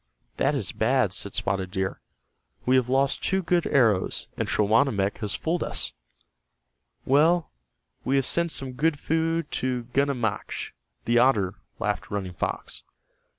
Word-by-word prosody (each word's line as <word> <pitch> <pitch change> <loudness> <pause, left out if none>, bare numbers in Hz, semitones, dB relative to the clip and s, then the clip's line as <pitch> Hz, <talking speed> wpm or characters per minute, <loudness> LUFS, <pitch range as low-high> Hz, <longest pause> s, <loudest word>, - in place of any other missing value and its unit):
"That - - +2
is - - -2
bad," - - +1
said - - -3
Spotted 95 -1 -1
Deer. 95 0 -3 0.6
"We 130 - +4
have 125 -1 +2
lost 135 +1 +2
two 190 0 +1
good 175 0 +1
arrows, 110 -8 +2
and - - -2
Schawanammek 105 -1 +2
has 105 -3 -2
fooled 165 +2 -1
us." - - -1 1.1
"Well, 160 +5 +3 0.5
we 130 +3 +1
have 135 -2 +2
sent 170 +4 +2
some 135 -3 -2
good 150 +4 +1
food 165 +1 -1
to 125 -1 -1
Gunammachk, 125 -7 -1 0.3
the 120 +1 +4
otter," 105 -7 +3 0.2
laughed 105 0 -2
Running 95 -3 -3
Fox. 85 - -3
130 Hz, 140 wpm, -26 LUFS, 105-150 Hz, 1.1 s, We